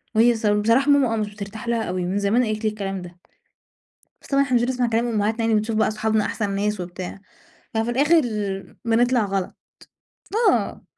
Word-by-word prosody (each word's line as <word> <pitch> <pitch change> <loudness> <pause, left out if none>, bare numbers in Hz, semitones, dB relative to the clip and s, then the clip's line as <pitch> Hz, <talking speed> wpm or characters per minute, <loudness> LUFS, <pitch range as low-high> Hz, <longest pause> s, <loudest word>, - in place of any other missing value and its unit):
وهي 235 +1 +5
ص 220 - -5
بصراحة 230 +7 +3
ماما 265 -5 +3
آه، - - -1
مش 210 -1 -3
بترتاح 210 +3 -8
لها 230 -1 0
أوي 180 -1 -2
من 190 +3 -1
زمان 215 +5 +2
قالت 215 0 -3
لي 215 - +2
الكلام 195 -3 -4
ده. 175 0 -12 1.0
بس - - -15
طبعًا 275 0 +3
إحنا 255 -3 +1
مش 235 - +3
بنسمع 250 0 0
كلام 230 +1 +1
امهاتنا 220 0 0
يعني 225 -1 +2
بنشوف 215 +1 0
بَقى 220 - +2
صحابنا 220 0 0
أحسن 210 -3 -2
ناس 205 0 -1
وبتاع، 180 +2 -7 0.5
ففي 225 +2 0
الآخر 295 +6 +4 0.6
بنطلع 240 0 +2
غلط، 195 -2 -2 1.0
آه. - - -1
220 Hz, 185 wpm, -23 LUFS, 205-240 Hz, 1.0 s, وهي